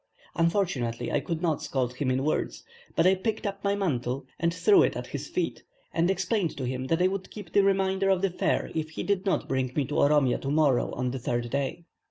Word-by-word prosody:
Unfortunately 165 - 0
I - - +2
could 165 +4 -4
not 160 -4 +1
scold 125 -2 -1
him 135 -2 0
in 130 +1 +1
words, 155 - -1 0.3
but 165 - +3
I 185 - +6
picked 215 +4 -2
up 200 -1 -3
the 200 0 +1
mantle 135 -8 -1
and 170 0 +2
threw 385 - +5
it - - +2
at - - -4
his - - -6
feet, - - -2 0.3
and 170 +2 +2
explained 190 -1 0
to 135 - -3
him 130 +1 -3
that 165 +4 +2
I - - +5
would 190 0 -4
keep 200 -6 -10
the 200 - +6
remainder 195 0 +2
of 190 -1 +2
the 195 - +2
fare - - 0
if 160 -1 -2
he 160 - -5
did 200 -1 0
not 190 - +1
bring 130 -1 -1
me 145 - +1
to 145 - -1
Oromia 140 -3 +4
to 135 - -3
morrow 145 -4 +2
on 125 0 -1
the 130 - -4
third 120 0 -2
day. 140 +4 -2
165 Hz, 235 wpm, -27 LUFS, 135-190 Hz, 0.3 s, I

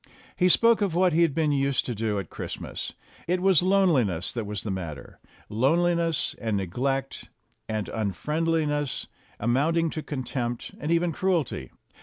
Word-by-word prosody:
He 180 0 +3
spoke 230 +4 +5
of 195 -5 0
what 180 -1 +3
he 165 - +3
had 165 -5 +3
been 155 -2 +2
used 140 -2 +1
to 125 - -2
do 110 -1 -1
at 95 -5 -5
Christmas. - - -6 0.3
It 180 +2 +1
was 190 -3 +4
loneliness 160 - +2
that 115 -4 -4
was 105 -1 -4
the 105 - -3
matter 80 -8 -6 0.3
loneliness, 165 +7 +1
and 110 -3 0
neglect, 135 +9 -2 0.4
and 110 -2 -2
un 110 -3 -2
friendliness, 150 - -1 0.3
amounting 155 +8 +1
to 155 - -4
contempt 125 -4 -4
and 150 - -2
even 170 0 +2
cruelty. 175 -4 -1
145 Hz, 155 wpm, -26 LUFS, 115-170 Hz, 0.4 s, spoke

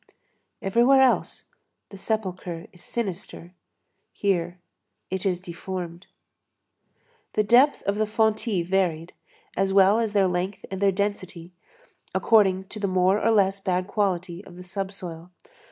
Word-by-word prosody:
Everywhere 240 +7 +4
else 260 - 0 0.4
the 200 - -11
sepulchre 185 -5 -3
is 175 - -16
sinister; 185 -5 -5 0.6
here 175 -3 -1 0.5
it 190 +1 -1
is 180 -2 0
deformed. 180 0 -7 1.3
The 215 - +2
depth 250 +7 +4
of 200 +1 -1
the 215 0 +1
fontis 220 -3 +1
varied, 175 -3 0 0.4
as 195 0 +1
well 195 +3 +5
as 225 -3 -1
their 195 -2 +4
length 180 +2 -3
and 190 0 -4
their 200 -1 +4
density, 185 -3 -4 0.6
according 195 -4 +4
to 215 - -6
the 200 - 0
more 185 +2 +2
or 225 - +3
less 200 -3 +3
bad 185 -2 -1
quality 185 -3 -2
of 180 - -14
the 180 - -10
sub 190 +2 -4
soil. 175 -3 -8
190 Hz, 135 wpm, -25 LUFS, 180-210 Hz, 1.3 s, well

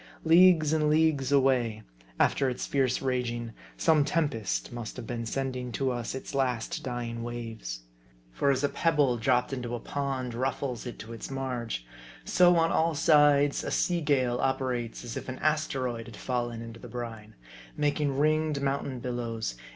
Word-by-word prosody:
Leagues 165 -2 +6
and 155 -1 +2
leagues 150 -3 +2
away, 125 -6 +2 0.4
after 135 -2 +3
its 125 - -3
fierce 135 -2 0
raging, 120 -3 -2 0.2
some 160 -3 +4
tempest 115 - -1
must 120 -2 -6
have - - -6
been 115 0 -4
sending 125 0 -3
to 135 +1 0
us 120 0 -3
its 130 - -7
last 125 -4 -1
dying 120 -2 -4
waves. 115 - -6 0.5
For 140 - +1
as 135 0 +2
a 145 - +3
pebble 145 -7 +2
dropped 125 +3 +1
into 120 -2 -3
a - - -4
pond 135 -2 -3
ruffles 130 0 -2
it 120 - -7
to 115 +2 -8
its 115 - -7
marge; 125 - -3 0.4
so, 180 -1 +5
on 165 0 +3
all 165 0 +2
sides, 145 -2 +4
a - - -3
sea 175 -1 +1
gale 130 -5 +1
operates 130 -4 -1
as 120 -2 -6
if 130 0 -5
an 130 - -5
asteroid 130 -6 -1
had 115 -3 -10
fallen 120 -2 -2
into 115 0 -9
the - - -10
brine; 115 -3 -7 0.4
making 145 -2 0
ringed 155 0 +2
mountain 135 -2 -2
billows? 120 - -3
130 Hz, 165 wpm, -28 LUFS, 120-145 Hz, 0.5 s, Leagues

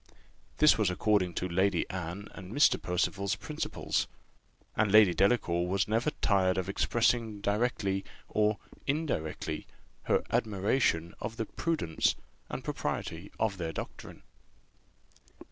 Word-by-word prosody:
This 150 -5 +6
was 105 -4 +3
according 90 -1 +1
to 90 - -1
Lady 95 0 +1
Anne 90 +2 -5
and 95 0 -9
Mr. 145 +6 +4
Percival's 100 +3 0
principles; 150 +9 -2 0.7
and 110 -2 +2
Lady 105 -4 +7
Delacour 90 -3 +2
was 95 +1 +1
never 115 +7 +1
tired 95 -3 +3
of 95 -1 -1
expressing 110 +2 +1
directly 100 -2 0 0.2
or 105 0 +2 0.3
indirectly 140 - -2 0.4
her - - +2
admiration 100 -5 +1
of 110 +1 -5
the 115 - -1
prudence 155 - 0 0.3
and - - -5
propriety - - -4
of 105 -3 0
their 85 -3 -3
doctrine. - - -8
100 Hz, 120 wpm, -30 LUFS, 90-110 Hz, 0.7 s, Lady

